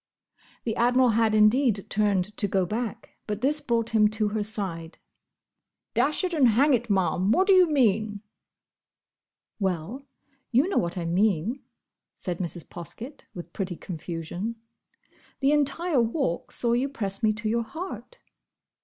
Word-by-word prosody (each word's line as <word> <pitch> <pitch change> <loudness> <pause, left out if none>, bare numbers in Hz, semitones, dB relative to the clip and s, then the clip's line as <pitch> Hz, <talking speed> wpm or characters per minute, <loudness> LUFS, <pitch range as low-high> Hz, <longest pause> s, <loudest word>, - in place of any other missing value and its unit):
The 225 - -2
Admiral 250 +1 +4
had 220 -1 +2
indeed 215 -1 +3
turned 205 -1 0
to 205 - +1
go 190 -1 +1
back; 230 +4 -5
but 210 0 -3
this 295 +3 +1
brought 230 -2 0
him 215 -2 +5
to 215 0 -1
her 215 +1 -2
side. 190 -6 -1 1.0
"Dash 305 +5 +1
it 365 -1 -1
and 285 -6 +4
hang 270 +6 +4
it, 240 -1 0
Ma'am! 190 0 +1
what 375 +10 +4
do 395 - +5
you 365 -2 +6
mean?" 215 -7 +1 1.4
"Well, 195 - -3 0.4
you 260 +7 +4
know 390 - +1
what 170 +1 -2
I 170 - -3
mean," 200 - +1 0.5
said 175 -2 -4
Mrs. 175 -2 -4
Poskett, 225 - -8
with 175 -1 -9
pretty 185 -3 -3
confusion. 175 +6 -5 0.8
"The 275 +1 +3
entire 295 0 +1
Walk 230 - -1
saw 235 -1 +1
you 255 +4 +1
press 195 -7 -3
me 220 - +3
to 210 +1 -4
your 230 +2 +1
heart!" 360 - -8
220 Hz, 150 wpm, -26 LUFS, 195-260 Hz, 1.4 s, you